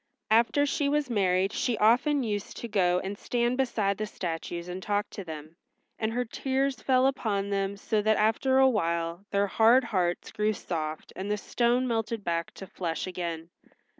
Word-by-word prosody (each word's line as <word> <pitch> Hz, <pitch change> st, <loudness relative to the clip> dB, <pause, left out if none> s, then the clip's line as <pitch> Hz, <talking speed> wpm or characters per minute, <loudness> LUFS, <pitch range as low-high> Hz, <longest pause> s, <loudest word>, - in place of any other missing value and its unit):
After 235 Hz, +6 st, +4 dB
she 285 Hz, 0 st, 0 dB
was 290 Hz, -3 st, 0 dB
married 190 Hz, -1 st, +2 dB
she 240 Hz, -3 st, 0 dB
often 255 Hz, +6 st, +3 dB
used 205 Hz, -3 st, -3 dB
to 235 Hz, -, -5 dB
go 180 Hz, -4 st, +2 dB
and 195 Hz, +1 st, -4 dB
stand 240 Hz, 0 st, 0 dB
beside 215 Hz, -7 st, 0 dB
the 215 Hz, -, -2 dB
statues 170 Hz, -2 st, -5 dB
and 180 Hz, +1 st, -5 dB
talk 205 Hz, +1 st, -1 dB
to 200 Hz, -, -6 dB
them, 160 Hz, -1 st, -9 dB, 0.4 s
and 220 Hz, 0 st, 0 dB
her 245 Hz, +2 st, -1 dB
tears 265 Hz, +2 st, -1 dB
fell 260 Hz, -1 st, +3 dB
upon 205 Hz, -7 st, 0 dB
them 195 Hz, 0 st, -1 dB
so 210 Hz, +1 st, 0 dB
that 215 Hz, +1 st, +2 dB
after 225 Hz, +5 st, +2 dB
awhile 170 Hz, -9 st, +2 dB
their 200 Hz, 0 st, +2 dB
hard 230 Hz, +6 st, +5 dB
hearts 180 Hz, -6 st, -1 dB
grew 210 Hz, +1 st, 0 dB
soft 155 Hz, -5 st, -5 dB
and 195 Hz, +2 st, -5 dB
the 210 Hz, -, +1 dB
stone 240 Hz, +4 st, +1 dB
melted 225 Hz, -2 st, -2 dB
back 170 Hz, -1 st, -2 dB
to 195 Hz, -, -8 dB
flesh 170 Hz, -3 st, -4 dB
again. 170 Hz, -2 st, -5 dB
210 Hz, 175 wpm, -28 LUFS, 180-240 Hz, 0.4 s, hard